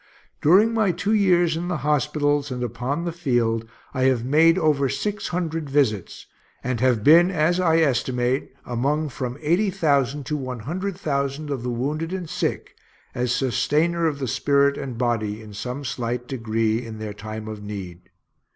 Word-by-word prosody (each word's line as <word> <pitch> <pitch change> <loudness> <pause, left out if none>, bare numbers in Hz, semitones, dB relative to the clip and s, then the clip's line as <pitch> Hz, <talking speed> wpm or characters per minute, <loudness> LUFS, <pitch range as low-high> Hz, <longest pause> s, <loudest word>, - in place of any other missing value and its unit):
During 200 +9 +5
my 215 -4 +2
two 185 +5 -1
years 175 -5 +3
in 170 +2 -3
the 180 -2 -1
hospitals 145 -1 +1
and 125 -1 -3
upon 125 +8 -3
the 170 - -1
field, 120 -9 0 0.2
I 130 0 +1
have 125 -3 +2
made 160 +5 +5
over 150 -6 +2
six 210 +7 -2
hundred 165 -4 -3
visits, 125 -10 0 0.4
and 130 -1 -1
have 125 -4 +2
been, 170 +6 +7
as 175 0 +1
I 165 -3 +3
estimate, 130 -2 0
among 145 +6 0
from 125 -1 -5
eighty 175 +7 +2
thousand 140 -5 +1
to 150 - -2
one 130 -4 -5
hundred 180 - -4
thousand 140 -3 -2
of 135 -4 -2
the 125 - -3
wounded 150 +8 -2
and 185 -3 -4
sick, - - -3 0.4
as 125 -1 -1
sustainer 155 +6 +1
of 140 -4 -2
spirit 140 +3 +2
and 130 -4 -5
body 110 -4 -1
in 110 -2 -11
some 125 +7 -5
slight 120 0 -3
degree, 115 -2 -1
in 115 -2 -8
their 110 -1 -5
time 110 +1 -7
of 110 -1 -6
need. 95 -4 -8
140 Hz, 170 wpm, -23 LUFS, 120-160 Hz, 0.4 s, been